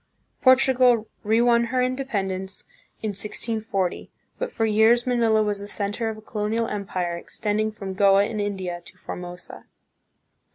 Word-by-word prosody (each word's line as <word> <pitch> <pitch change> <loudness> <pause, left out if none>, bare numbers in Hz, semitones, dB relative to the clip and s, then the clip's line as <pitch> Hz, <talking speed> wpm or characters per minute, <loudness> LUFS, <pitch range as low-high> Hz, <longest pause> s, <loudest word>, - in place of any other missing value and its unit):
Portu 260 0 +6
gal 245 -3 +4 0.2
re 220 +2 +3
won 235 -1 +4
her 255 +2 -1
independence 200 -8 -2 0.4
in 215 - 0
1640, 210 -1 -2 0.3
but - - -2
for 225 - 0
years 220 +3 +4
Manila 230 -3 +3
was 205 -1 -1
the 200 - -7
center 205 +2 -2
of 220 - -5
a - - -11
colonial 220 +1 -2
empire, 185 -4 -3
extending 215 +4 -2
from 195 -3 -6
Goa 195 0 +5
in 215 +1 -3
India 190 -4 -3
to - - -16
Formosa. 180 0 -8
215 Hz, 150 wpm, -24 LUFS, 195-235 Hz, 0.4 s, Portu